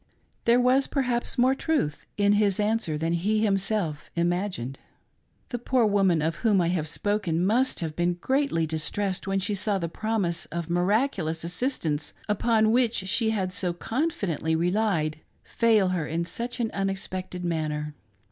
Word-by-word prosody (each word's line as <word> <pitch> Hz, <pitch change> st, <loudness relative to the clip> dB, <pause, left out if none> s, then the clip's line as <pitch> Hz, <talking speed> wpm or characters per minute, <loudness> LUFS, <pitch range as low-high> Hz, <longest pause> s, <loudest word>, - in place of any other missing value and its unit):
There 235 Hz, +1 st, +5 dB
was, 255 Hz, +2 st, +3 dB
perhaps, 250 Hz, -2 st, 0 dB
more 255 Hz, +2 st, +4 dB
truth 270 Hz, -, -1 dB
in 205 Hz, 0 st, +4 dB
his 205 Hz, -2 st, +2 dB
answer 210 Hz, -7 st, +1 dB
than 165 Hz, +2 st, -1 dB
he 210 Hz, +6 st, +1 dB
himself 195 Hz, -6 st, 0 dB
imagined. 175 Hz, -7 st, -1 dB, 0.7 s
The 245 Hz, -, -3 dB
poor 245 Hz, 0 st, +2 dB
woman 195 Hz, -6 st, +3 dB
of 160 Hz, +1 st, -1 dB
whom 215 Hz, -5 st, +3 dB
I 170 Hz, -1 st, +2 dB
have 170 Hz, -4 st, -1 dB
spoken 180 Hz, -1 st, -1 dB
must 240 Hz, +2 st, +2 dB
have 160 Hz, -2 st, -3 dB
been 175 Hz, 0 st, +1 dB
greatly 260 Hz, -, 0 dB
distressed 180 Hz, +5 st, -2 dB
when 195 Hz, 0 st, 0 dB
she 200 Hz, +2 st, -1 dB
saw 205 Hz, 0 st, 0 dB
the 170 Hz, -3 st, -2 dB
promise 200 Hz, -2 st, -2 dB
of 170 Hz, 0 st, -4 dB
miraculous 180 Hz, -, +1 dB
assistance 170 Hz, -, -2 dB
upon 220 Hz, +1 st, +2 dB
which 240 Hz, -1 st, +3 dB
she 190 Hz, +4 st, 0 dB
had 190 Hz, -4 st, -1 dB
so 180 Hz, -1 st, -1 dB
confidently 195 Hz, -, -1 dB
relied 175 Hz, -3 st, 0 dB, 0.2 s
fail 220 Hz, -5 st, +3 dB
her 175 Hz, -5 st, -1 dB
in 165 Hz, +2 st, -2 dB
such 235 Hz, +8 st, -4 dB
an 225 Hz, -2 st, -1 dB
unexpected 185 Hz, -2 st, -3 dB
manner. 150 Hz, -3 st, -2 dB
195 Hz, 155 wpm, -26 LUFS, 170-220 Hz, 0.7 s, There